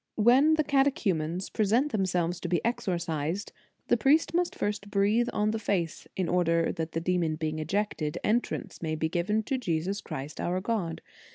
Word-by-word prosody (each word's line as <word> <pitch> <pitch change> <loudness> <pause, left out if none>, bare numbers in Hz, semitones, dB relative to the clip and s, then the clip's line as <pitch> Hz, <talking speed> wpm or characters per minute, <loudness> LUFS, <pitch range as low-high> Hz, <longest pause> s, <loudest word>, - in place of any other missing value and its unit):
"When 260 +8 +5
the 310 - +2
catechumens 195 - +1
present 230 +8 +2
them 195 -5 +1
selves 175 -1 0
to - - -4
be 175 - +2
exorcised, 170 -5 -2 0.4
the 240 - +3
priest 285 +10 +3
must 350 0 +1
first 205 -1 -3
breathe 210 +4 +2
on 210 0 +1
the 225 - -2
face, 180 -6 -2
in 185 -2 -1
order 170 -1 +2
that 160 0 -4
the 165 - 0
demon 170 -2 0
being 155 0 -3
ejected, 155 -2 -1
entrance 235 +3 -1
may 160 -2 -1
be 160 0 -1
given 210 +6 0
to 260 +4 -1
Jesus 190 -1 -1
Christ, 140 +3 -6
our 180 +1 0
God. 185 -5 -2
190 Hz, 175 wpm, -28 LUFS, 165-225 Hz, 0.4 s, When